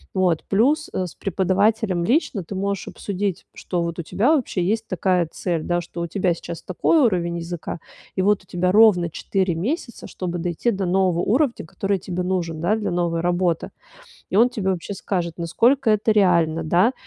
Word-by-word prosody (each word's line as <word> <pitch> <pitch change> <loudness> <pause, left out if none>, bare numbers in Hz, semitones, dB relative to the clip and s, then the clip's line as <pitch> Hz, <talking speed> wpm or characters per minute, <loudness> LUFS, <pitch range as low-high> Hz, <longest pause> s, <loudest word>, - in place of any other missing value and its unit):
Вот, 180 -4 +2
плюс, 285 +10 +2
э, 185 - -1
с 175 - -8
преподавателем 195 0 +1
лично 230 - +1
ты 195 - -7
можешь 200 0 -2
обсудить, 200 -2 -3
что 175 -2 -3
вот 170 0 -4
у - - -2
тебя 240 - +2
вообще 230 - -1
есть 220 +4 -1
такая 180 -2 +1
цель, 170 -4 -2
да, 175 +1 0
что 170 0 -7
у 170 - -2
тебя 180 0 0
сейчас 170 0 -8
такой 190 - +2
уровень 175 - +1
языка. 170 0 -5 0.4
И 190 - +1
вот 200 0 +2
у - - -28
тебя 180 +1 0
ровно 200 -5 +5
4 185 +2 -1
месяца, 235 - -4
чтобы 175 -1 -4
дойти 175 +7 -1
до 195 -2 -2
нового 180 -1 +2
уровня, 245 - +1
который 195 +4 -1
тебе 180 0 -4
нужен, 175 -3 -2
да, 185 +6 +2
для 215 - -2
новой 170 -1 0
работы. 175 -1 0 0.6
И - - 0
он 235 +4 +6
тебе 210 -6 -2
вообще 185 +2 -3
скажет, 175 -4 -3
насколько 230 - +2
это 215 +1 +2
реально, 170 -5 +3
да. 180 +9 +3
185 Hz, 185 wpm, -22 LUFS, 175-205 Hz, 0.6 s, он